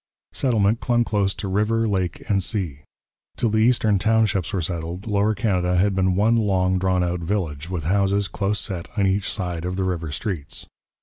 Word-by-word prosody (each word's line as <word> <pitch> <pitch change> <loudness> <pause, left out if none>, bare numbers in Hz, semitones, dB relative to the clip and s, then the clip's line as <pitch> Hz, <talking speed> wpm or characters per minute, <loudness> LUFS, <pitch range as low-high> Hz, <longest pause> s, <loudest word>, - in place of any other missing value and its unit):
Settlement 115 -3 +2
clung 120 -1 +2
close 100 -3 0
to 100 - -5
river, 105 +4 +1
lake, 95 -4 -2
and 100 -2 +2
sea. 90 - -2 0.6
Till 115 - +1
the 110 - +2
Eastern 110 -3 +3
Townships 110 -4 +1
were 95 - -1
settled, 85 +2 -4
Lower 105 0 +1
Canada 90 -4 +1
had 100 +2 +3
been 95 -1 +2
one 110 +4 +3
long 95 -4 +1
drawn 95 -1 +1
out 90 0 -1
village 85 -4 -3
with 90 -4 -3
houses 100 +3 +1
close 100 0 -1
set 90 -5 -4
on 100 - +3
each 95 +1 0
side 90 -4 -3
of 90 +1 -3
the 95 - -1
river 85 -4 -2
streets. 80 -2 -4
95 Hz, 185 wpm, -23 LUFS, 90-105 Hz, 0.6 s, Eastern